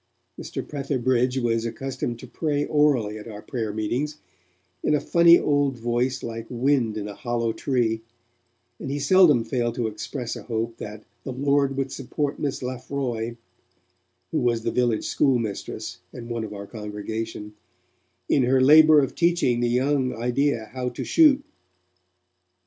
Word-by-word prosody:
Mr. - - -6
Petherbridge 130 -3 0
was 115 -2 0
accustomed 125 0 -4
to 125 - -10
pray 145 +3 -1
orally 130 -8 +2
at 105 - -10
our 105 -2 -9
prayer 115 -4 -3
meetings, 125 +8 -2 0.6
in 150 - +2
a - - +2
funny 170 +3 +6
old 145 -3 +1
voice 120 +3 -1
like 115 -1 -5
wind 125 -3 +1
in 105 -1 -4
a 105 - -6
hollow 115 -1 -2
tree, 115 -4 0 0.8
and - - -5
he 140 - -2
seldom 145 -4 +5
failed 120 0 -1
to 120 - -1
express 115 +3 -4
a - - -7
hope 115 0 -3
that 105 +1 -8 0.2
'the 130 - -5
Lord 140 +1 +1
would 135 -1 -2
support 140 +2 -3
Miss 140 -3 -2
Lafroy' 125 -2 -3 0.9
who - - +1
was 120 -2 +1
the - - 0
village 120 -3 +1
schoolmistress, 120 -8 -1
and 120 -1 -9
one 115 -1 -2
of 110 - -6
our 100 -1 -7
congregation, 105 0 -6 0.7
'in 140 - +3
her 130 +1 +3
labour 155 +3 +7
of 135 - -2
teaching 170 -8 +2
the 120 0 +1
young 130 +1 +1
idea 120 -1 0
how 125 -1 -2
to 120 - -6
shoot'. 295 -4 +5
125 Hz, 155 wpm, -24 LUFS, 115-140 Hz, 0.9 s, labour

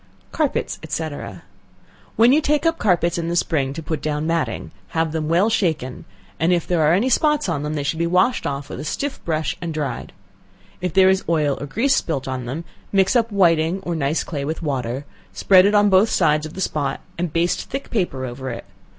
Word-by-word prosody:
Carpets, - - -1
&c. 160 -1 -2 1.1
When 235 +4 +6
you 305 - +4
take 300 +2 +1
up 330 0 +2
carpets 175 -3 +2
in 165 - -3
the 170 - -1
spring 145 -5 +1
to 165 +2 -7
put 155 -2 -3
down 150 0 -2
matting, 155 - -2 0.3
have 160 -1 +1
them 155 -1 -2
well 175 +5 +3
shaken, 160 - -1 0.3
and 165 +3 +2
if 175 -2 +1
there 175 -2 +1
are 155 +1 +4
any 215 +7 +1
spots 300 +2 +2
on 165 -5 -1
them, 150 +1 -3
they 145 - -2
should 160 +3 -2
be 170 - +1
washed 185 +8 +2
off 140 0 -4
with - - -6
a - - -5
stiff 275 - -4
brush 160 -1 -1
and 165 -2 -4
dried; 150 -2 -3 0.7
if 180 -1 -1
there 190 +1 +5
is 190 0 0
oil 150 -4 +2
or 145 - -4
grease 260 - +2
spilt 140 - -2
on 130 -2 -3
them, 140 +7 -4 0.3
mix 195 +3 +3
up 230 -2 +2
whiting 170 -2 +3
or 175 - -2
nice 155 0 0
clay 145 -4 -4
with 155 +3 -4
water; 135 -2 -2 0.3
spread 190 0 +5
it 210 - +2
on 205 0 +5
both 190 +4 +5
sides 155 -3 +2
of 155 - -13
the 190 - -5
spot, 145 -6 -2 0.2
and 175 -2 -1
baste 170 +3 0
thick 275 +1 -5
paper 175 - -1
over 130 +2 -6
it. 115 - -6
165 Hz, 215 wpm, -21 LUFS, 150-190 Hz, 1.1 s, When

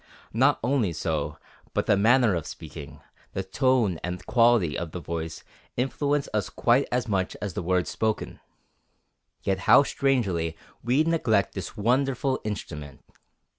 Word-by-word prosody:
Not - - +3
only 120 -8 +1
so, 75 -2 -2 0.4
but - - +1
the - - +4
manner 115 +2 +4
of 85 -4 -2
speaking, - - -9 0.3
the 95 - -2
tone 115 - +1
and 90 0 -4
quality 115 -9 +3
of 85 -2 -4
the 90 - -4
voice 80 -1 -5 0.3
influence 140 +3 0
us 105 -1 0
quite 125 +3 +2
as 125 -2 0
much 95 -3 -1
as 100 -4 -4
the - - -3
words 90 0 0
spoken. 110 -1 -2 1.0
Yet 95 -1 0
how - - +9
strangely 100 - 0 0.3
we 125 +6 +3
neglect 125 -12 +1
this 95 +4 -6
wonderful 130 +4 +1
instrument. 75 -9 -6
105 Hz, 140 wpm, -26 LUFS, 85-125 Hz, 1.0 s, how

